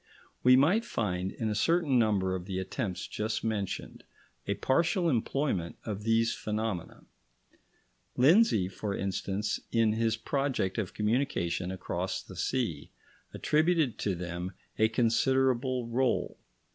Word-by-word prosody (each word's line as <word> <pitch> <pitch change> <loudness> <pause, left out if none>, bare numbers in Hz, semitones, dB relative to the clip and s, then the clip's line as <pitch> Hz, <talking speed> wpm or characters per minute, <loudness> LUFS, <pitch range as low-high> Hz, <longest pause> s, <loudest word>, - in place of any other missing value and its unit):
We 125 0 +7
might 170 - +4
find, 95 - -2
in 110 - -3
a 105 - 0
certain 150 +3 +2
number 100 -5 +2
of 90 -1 -4
the 95 -1 -4
attempts 95 0 -3
just 110 +1 -3
mentioned, 105 -4 -3 0.4
a - - 0
partial 170 +6 +1
employment 115 - -1
of 105 -3 -4
these 115 0 +3
phenomena. 105 -4 -4 1.1
Lindsay, 145 - +5
for 100 +1 -4
instance, 100 +1 -2
in 115 -2 +3
his 115 0 +1
project 130 -6 -1
of 100 -5 -4
communication 105 -6 0
across 95 0 -3
the - - -12
sea, - - -2 0.4
attributed 155 - +1
to 100 -3 0
them 90 +1 -5 0.3
a 110 - +5
considerable 125 +2 +1
rôle. 125 +2 0
110 Hz, 125 wpm, -30 LUFS, 95-130 Hz, 1.1 s, We